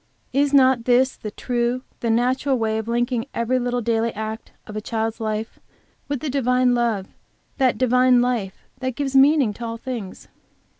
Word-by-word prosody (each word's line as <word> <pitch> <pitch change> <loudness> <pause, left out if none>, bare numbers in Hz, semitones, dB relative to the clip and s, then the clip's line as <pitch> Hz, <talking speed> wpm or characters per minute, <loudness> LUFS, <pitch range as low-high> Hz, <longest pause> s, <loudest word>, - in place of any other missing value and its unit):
Is 280 +1 +2
not 260 -4 +4
this 255 +2 +3
the 215 - -7
true, 240 +3 -2 0.2
the 235 - -2
natural 255 +4 +1
way 220 -1 0
of 220 - -6
linking 240 +1 -1
every 240 +2 +1
little 245 0 -1
daily 230 0 0
act 220 +1 -6
of 215 - -9
a 215 - -3
child's 225 +1 -3
life 220 0 -4 0.5
with 285 -3 -3
that 300 - -3
Divine 250 -2 +2
Love, 230 -5 0 0.5
that 255 -4 +3
Divine 250 0 +4
Life 240 -6 -1 0.2
which 260 -1 -3
gives 275 -1 -3
meaning 270 -4 +5
to 235 - -9
all 230 0 -4
things? 230 -6 -7
245 Hz, 170 wpm, -22 LUFS, 225-255 Hz, 0.5 s, meaning